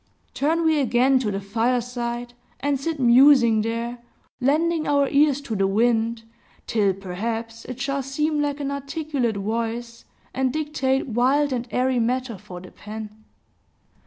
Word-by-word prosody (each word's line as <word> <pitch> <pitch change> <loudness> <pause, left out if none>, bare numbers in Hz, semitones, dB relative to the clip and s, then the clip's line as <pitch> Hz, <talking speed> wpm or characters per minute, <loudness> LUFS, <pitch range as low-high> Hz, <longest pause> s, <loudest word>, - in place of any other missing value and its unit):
Turn 325 +4 +1
we 315 -2 +3
again 260 0 +3
to 235 -5 -1
the 195 -1 -2
fireside, 240 +3 -2 0.3
and 280 0 0
sit 315 +2 -3
musing 245 -2 +6
there, 230 +2 -3 0.4
lending 310 +5 +1
our 285 -1 +3
ears 285 0 +3
to 240 -6 -4
the 195 -1 +2
wind, 225 +2 +1 0.4
till 205 -4 +1
perhaps 225 +5 -5
it 255 0 -7
shall 275 +1 -1
seem 295 +3 -1
like 290 0 -1
an 280 -1 -2
articulate 280 -5 -2
voice, 230 +3 -3 0.3
and 260 -1 0
dictate 275 -3 -1
wild 265 +5 +2
and 245 -1 -3
airy 255 0 +1
matter 245 -2 -1
for 185 -3 -9
the 185 - -12
pen. 215 0 -9
245 Hz, 145 wpm, -23 LUFS, 225-280 Hz, 0.4 s, musing